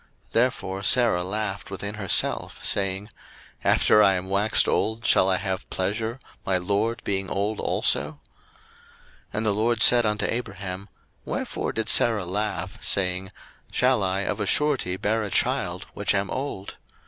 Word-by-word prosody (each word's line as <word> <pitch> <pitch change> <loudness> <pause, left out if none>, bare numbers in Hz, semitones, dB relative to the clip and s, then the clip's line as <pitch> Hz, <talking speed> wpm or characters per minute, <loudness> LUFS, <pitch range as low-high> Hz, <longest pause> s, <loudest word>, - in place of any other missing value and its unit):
01:018:012 - - -34
Therefore 115 -5 0
Sarah 115 -7 +3
laughed 100 +1 -4
within 100 +1 -4
herself, 105 -3 0
saying, 95 +2 -2 0.5
After 105 - +4
I 95 -2 +5
am 90 +1 -4
waxed 100 +3 +2
old 110 +1 -1
shall 95 - +4
I 95 - +3
have 95 -1 -4
pleasure, 110 +6 -2 0.2
my 95 -1 +1
lord 105 +6 -1
being 95 -1 -2
old 100 +2 -2
also? 75 +2 0
01:018:013 75 - -24 1.1
And 105 - -2
the 105 - +2
LORD 110 +2 +1
said 120 -1 +7
unto 105 -1 0
Abraham, 100 -4 -5 0.3
Wherefore - - -3
did 110 - -2
Sarah 110 -5 +4
laugh, 95 -1 -3
saying, 95 -1 0 0.4
Shall 125 -2 +2
I 95 0 0
of 105 +1 -2
a 105 - -2
surety 135 -12 +1
bear 110 +3 0
a 105 - -4
child, - - -1
which - - 0
am 100 0 -1
old? 130 -8 -5
100 Hz, 155 wpm, -24 LUFS, 95-110 Hz, 1.1 s, said